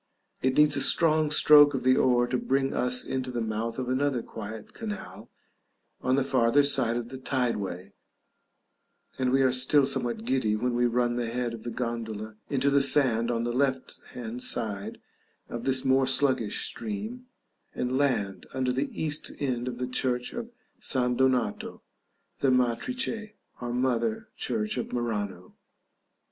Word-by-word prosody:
It 130 0 0
needs 150 0 +5
a - - 0
strong 155 -2 +4
stroke 145 -1 +6
of 130 - -3
the 130 0 +4
oar 120 -2 +3
to 125 - -3
bring 135 0 0
us 125 0 0
into 130 -1 -3
the 120 -1 -3
mouth 115 +1 -3
of 130 -1 -3
another 130 -1 0
quiet 110 0 -9
canal 210 -3 -8 0.7
on 130 0 +1
the 140 - +1
farther 130 +1 +3
side 130 -4 +2
of 120 -1 -5
the 130 0 -8
tide 130 -2 -1
way, 95 -1 -6 1.3
and 130 -1 +1
we 135 +1 +3
are 130 - +3
still 130 +3 +4
somewhat 120 -4 +1
giddy 125 -4 0
when 125 +3 -1
we 120 0 +2
run 120 0 0
the 120 -2 -2
head 120 0 -2
of 115 - -8
the 120 - -6
gondola 110 -3 -5
into 140 0 +1
the 140 0 +4
sand 130 -4 +5
on 115 -1 -1
the 120 0 -2
left 130 0 -1
hand 120 0 -6
side 105 -6 -2 0.5
of 120 0 -6
this 135 0 +1
more 130 0 +3
sluggish 130 -5 +2
stream, 225 +2 -6 0.5
and 125 +1 -2
land 105 -9 -1
under 130 -1 0
the 135 +3 -2
east 155 -1 -2
end 125 -3 -2
of 125 -1 -4
the 125 - -3
Church 125 -1 -1
of 235 -1 -6 0.3
San 125 -2 0
Donato, 130 -4 -1 0.6
the 135 - +2
"Matrice" 215 - 0 0.3
or 120 -1 -4
"Mother" 120 -3 -1
Church 105 +3 -2
of - - -5
Murano. 105 -6 -4
125 Hz, 165 wpm, -27 LUFS, 115-135 Hz, 1.3 s, stroke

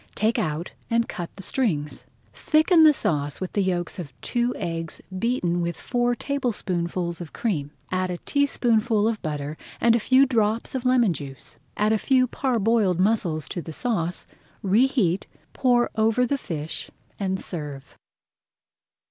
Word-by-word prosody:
Take 220 +2 +1
out 155 +3 -2 0.2
and 230 0 +2
cut 175 -5 -5
the 195 - -9
strings. 150 - -1 0.3
Thicken 315 - +4
the 310 -1 +9
sauce 145 - 0
with 185 - -5
the 205 - +2
yolks 180 -1 -1
of 140 -7 -8
two 240 0 0
eggs 165 -1 -4 0.2
beaten 180 -7 0
with 170 0 -2
four 245 -1 0
tablespoonfuls 185 - -2
of 165 - -8
cream, 155 -11 -1 0.2
add 185 0 0
a 180 - -3
teaspoonful 230 -5 +2
of 225 -2 -1
butter 150 -1 -3 0.2
and 230 -1 +4
a - - +3
few 260 +5 +5
drops 225 -3 0
of 260 -1 -3
lemon 245 -7 +4
juice. 135 -4 -7 0.2
Add 210 +1 +3
a 220 - +2
few 260 +1 +3
parboiled 225 -7 +1
mussels 185 -6 +1
to 175 - -4
the 160 - -8
sauce, 180 - -1 0.4
reheat, 200 -3 +2 0.3
pour 245 -2 +2
over 225 +3 +3
the 280 +3 -1
fish, 155 -6 -5 0.3
and 190 -1 -1
serve. 145 -7 -6
205 Hz, 150 wpm, -25 LUFS, 170-240 Hz, 0.4 s, the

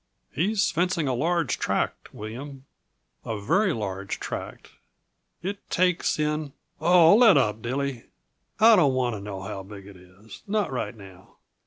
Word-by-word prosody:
"He's 200 +6 +1
fencing 170 -2 0
a 130 - 0
large 165 +2 0
tract, - - -2
William 130 +6 -8 0.6
a 110 -2 -4
very 190 - +2
large 100 - -4
tract. - - -7 0.7
It 200 +2 -6
takes 180 -1 +1
in 150 -1 -2
" - - -39
"Oh, 170 +1 +6
let 225 -7 +7
up, 110 -5 +1
Dilly! 130 0 -3 0.5
I 225 +1 +8
don't 145 -7 +3
want 125 -2 0
to 100 - -7
know 100 -2 -7
how 95 0 -6
big 100 0 -11
it 100 -2 -13
is 95 +4 -15
not 205 -4 0
right 125 -2 -3
now. 95 -2 -15
135 Hz, 155 wpm, -25 LUFS, 105-175 Hz, 0.7 s, I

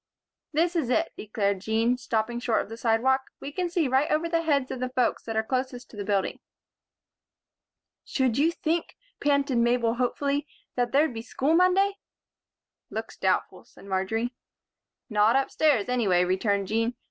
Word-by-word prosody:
"This 335 +3 +1
is 305 -8 0
it," 325 +6 +1
declared 200 -2 -1
Jean, 225 +4 +1
stopping 240 -1 -2
short 240 -2 +1
on - - -14
the 225 - -6
sidewalk. 245 +4 +1
"We 280 - -6
can 355 +3 -2
see 335 -4 +1
right 265 +3 +2
over 310 +2 +1
the 335 0 +1
heads 285 -5 +1
of 260 - -4
the 255 0 -2
folks 250 -1 0
that 225 - -4
are 220 - +2
close 255 +3 -1
to - - -16
the 205 - -4
building." 200 -1 -1 1.6
"Should 260 -4 0
you 320 +3 +4
think," 335 0 -2 0.2
panted 280 -3 +2
Mabel, 235 -1 +2
hopefully, 280 +4 -1 0.3
"that 245 -1 0
there'd 290 0 +3
be 225 - -5
school 270 +5 0
Monday?" 380 +3 +3 0.9
"Looks - - -5
doubtful," - - -1
said - - -17
Marjory. 200 +5 -1 0.7
"Not 215 0 +3
upstairs, 270 -3 +2
anyway," 210 -8 +2
returned 195 +2 0
Jean. 225 +2 0
250 Hz, 160 wpm, -27 LUFS, 225-290 Hz, 1.6 s, you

